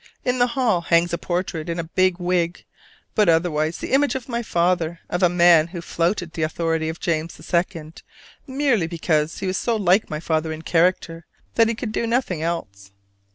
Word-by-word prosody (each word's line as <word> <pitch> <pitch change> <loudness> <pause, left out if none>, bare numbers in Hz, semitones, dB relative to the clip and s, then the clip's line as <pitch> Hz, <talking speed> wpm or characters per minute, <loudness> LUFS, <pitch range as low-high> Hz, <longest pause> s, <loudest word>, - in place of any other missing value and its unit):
In 250 0 0
the 245 - +4
hall 220 -9 +2
hangs 170 +1 +2
a - - +1
portrait 175 -2 -3
in 170 - -2
a 170 - -2
big 185 +2 +1
wig, 175 -1 -1 0.5
but 210 -4 +3
otherwise 160 -1 +1
the - - -6
image 275 +1 +3
of 260 -3 -5
my 235 -2 -2
father, 170 -4 0
of 175 - -1
a 180 - +5
man 170 -2 +5
who 175 0 -7
flouted 170 +1 -2
the 160 - -4
authority 160 0 -1
of 160 - -6
James 165 0 -2
II. 165 -2 -1 0.5
merely 260 - +1
because 160 -2 -1
he 195 - -5
was 185 +1 -1
so 235 - 0
like 200 -1 +2
my 150 - -3
father 160 0 -1
in 160 0 -7
character 165 -1 0 0.3
that 230 -1 +4
he 230 - -1
could 220 -1 -5
do 230 - -1
nothing 230 -9 -1
else. 100 -13 -4
170 Hz, 195 wpm, -22 LUFS, 165-190 Hz, 0.5 s, a